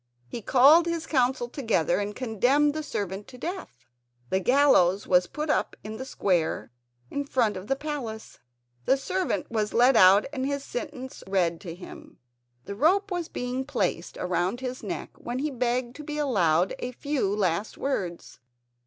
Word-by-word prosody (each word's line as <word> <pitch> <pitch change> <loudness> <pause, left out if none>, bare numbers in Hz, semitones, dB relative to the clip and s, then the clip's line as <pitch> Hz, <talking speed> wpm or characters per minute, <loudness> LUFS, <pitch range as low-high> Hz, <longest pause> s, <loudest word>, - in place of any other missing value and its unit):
He 235 - -6
called 285 +10 +6
his 335 -1 -2
Council 255 -3 +1
together 220 - 0
and 205 0 -3
condemned 260 +5 +2
the 310 - -3
servant 200 - -4
to 250 - -12
death. 330 - -7 0.5
The 190 - +2
gallows 205 -6 +4
was 180 -1 +3
put 300 0 -2
up - - 0
in 215 +1 -6
the 260 - -6
square 175 - -1 0.4
in 285 - -2
front 245 -7 +1
of 185 +2 -7
the 270 - +1
palace. 270 -7 -6 0.5
The 270 - +4
servant 370 +3 -2
was 215 -2 -1
led 245 +2 +5
out 195 +1 +7
and 260 -3 -2
his 280 0 -2
sentence 260 -1 -6
read 175 -4 0
to 170 -4 -7
him. 315 - -12 0.5
The 200 - -5
rope 375 - +2
was 350 -2 -2
being 250 +1 -3
placed 180 -8 -2
round 180 +5 -1
his 255 -1 -5
neck, - - -5
when 240 +1 -4
he 295 +3 -1
begged 245 -1 -1
to 300 - -8
be 300 0 -5
allowed 185 - +2
a 250 - -4
few 280 -5 -1
last 190 0 -1
words. 180 -11 -4
245 Hz, 170 wpm, -26 LUFS, 195-285 Hz, 0.5 s, out